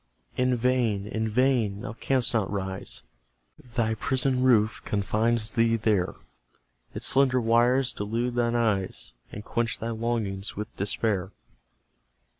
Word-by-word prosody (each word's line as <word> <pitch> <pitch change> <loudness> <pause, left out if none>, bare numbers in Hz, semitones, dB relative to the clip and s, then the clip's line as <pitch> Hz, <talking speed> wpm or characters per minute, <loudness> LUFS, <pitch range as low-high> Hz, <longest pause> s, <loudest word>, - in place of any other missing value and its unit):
In 125 0 +2
vain 120 -5 +1
in 110 +1 -2
vain! 115 -4 +1
Thou 105 - -5
canst 125 +1 0
not 110 -4 +1
rise: 95 -2 -3 0.7
Thy 110 -3 +1
prison 130 +3 0
roof 115 -4 +3
confines 110 +2 0
thee 115 0 +3
there; 105 -5 +1 0.8
Its - - -2
slender 130 -2 +4
wires 120 +3 +3
delude 115 +4 -2
thine 120 -1 +1
eyes, 100 - -1 0.2
And 105 - -8
quench 120 -1 -1
thy 115 +1 -4
longings 110 -4 -2
with 105 +1 -6
despair. 100 -1 -1
115 Hz, 125 wpm, -27 LUFS, 105-120 Hz, 0.8 s, slender